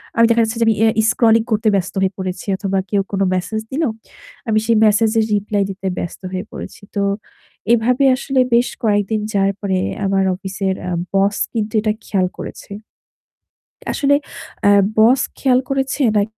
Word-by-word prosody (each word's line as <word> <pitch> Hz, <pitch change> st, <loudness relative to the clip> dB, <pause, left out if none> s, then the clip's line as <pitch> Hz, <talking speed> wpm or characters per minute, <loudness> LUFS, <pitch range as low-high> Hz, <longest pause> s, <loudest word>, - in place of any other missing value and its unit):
আমি 230 Hz, -, +5 dB
দেখা 230 Hz, 0 st, +4 dB
যাচ্ছে 225 Hz, +1 st, -2 dB
যে -, -, +4 dB
অ্যা 225 Hz, -, +4 dB
আমি 220 Hz, -, +1 dB
scrolling 225 Hz, -1 st, +3 dB
করতে 215 Hz, +1 st, +1 dB
ব্যস্ত 190 Hz, -2 st, -1 dB
হয়ে 190 Hz, 0 st, +1 dB
পড়েছি 185 Hz, 0 st, -5 dB
অথবা 195 Hz, -1 st, -1 dB
কেউ 200 Hz, -1 st, +2 dB
কোনো 195 Hz, 0 st, 0 dB
message 220 Hz, +4 st, -3 dB
দিল, 310 Hz, +5 st, -1 dB, 0.6 s
আমি 215 Hz, -1 st, +2 dB
সেই 230 Hz, -1 st, +3 dB
message 215 Hz, +1 st, +3 dB
এর 220 Hz, -, +2 dB
reply 205 Hz, 0 st, 0 dB
দিতে 195 Hz, 0 st, -5 dB
ব্যস্ত 175 Hz, -, -5 dB
হয়ে 185 Hz, +2 st, -4 dB
পড়েছি। -, -, -9 dB
তো 200 Hz, -, 0 dB, 0.7 s
এভাবে 245 Hz, +4 st, +2 dB
আসলে 270 Hz, 0 st, -1 dB
বেশ 240 Hz, +1 st, +3 dB
কয়েকদিন 210 Hz, 0 st, +1 dB
যার 195 Hz, 0 st, +2 dB
পরে 190 Hz, -2 st, -1 dB, 0.3 s
আমার 195 Hz, 0 st, +2 dB
অফিসের 190 Hz, 0 st, -3 dB
অ্যা 180 Hz, -, -3 dB, 0.2 s
boss 195 Hz, +1 st, +2 dB, 0.2 s
কিন্তু 220 Hz, 0 st, -2 dB
এটা 215 Hz, -1 st, +1 dB
খেয়াল 185 Hz, -3 st, 0 dB
করেছে। -, -, -9 dB, 1.2 s
আসলে 285 Hz, -1 st, +2 dB, 0.5 s
অ্যা 205 Hz, -, +6 dB, 0.3 s
boss 245 Hz, +4 st, +5 dB, 0.2 s
খেয়াল 255 Hz, -2 st, +3 dB
করেছে 270 Hz, +1 st, -1 dB
নাক 200 Hz, -, +4 dB
215 Hz, 170 wpm, -18 LUFS, 195-230 Hz, 1.2 s, অ্যা